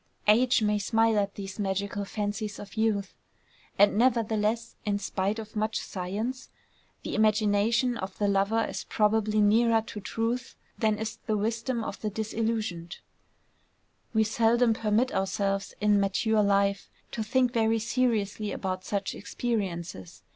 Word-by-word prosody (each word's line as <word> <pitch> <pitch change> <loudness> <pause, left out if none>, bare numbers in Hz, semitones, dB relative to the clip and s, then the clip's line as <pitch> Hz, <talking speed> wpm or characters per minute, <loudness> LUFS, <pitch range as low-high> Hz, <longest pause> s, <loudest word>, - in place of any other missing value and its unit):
Age 235 +2 +4
may 210 0 +2
smile 225 +1 +2
at 200 -1 -2
these 195 0 -7
magical 200 +1 -2
fancies 205 +1 -3
of 200 - -10
youth; 215 -3 0 0.6
and 205 +1 +5
nevertheless, 230 -2 +1
in 205 -1 0
spite 200 +1 -2
of 220 -1 -8
much 215 +1 0
science, 215 +8 -4 0.5
the - - -4
imagination 215 +3 +2
of 190 -2 -6
the 205 - +1
lover 200 +3 +2
is - - -5
probably 215 0 +2
nearer 225 +2 +4
to 215 - -7
truth 230 +4 -3 0.2
than 215 -2 +1
is 220 0 -4
the 215 -1 +1
wisdom 230 +3 -1
of - - -6
the 215 - -1
disillusioned. 215 -5 -3 1.1
We 220 -1 +3
seldom 230 +2 +3
permit 225 +3 +1
ourselves 195 +1 -1
in 210 -1 +3
mature 210 +2 +2
life 200 -1 +1 0.2
to 225 - -3
think 250 +3 +1
very 225 -1 +2
seriously 220 -3 0
about 185 -1 -3
such 200 0 -2
experiences. 180 - -4
215 Hz, 140 wpm, -28 LUFS, 200-225 Hz, 1.1 s, and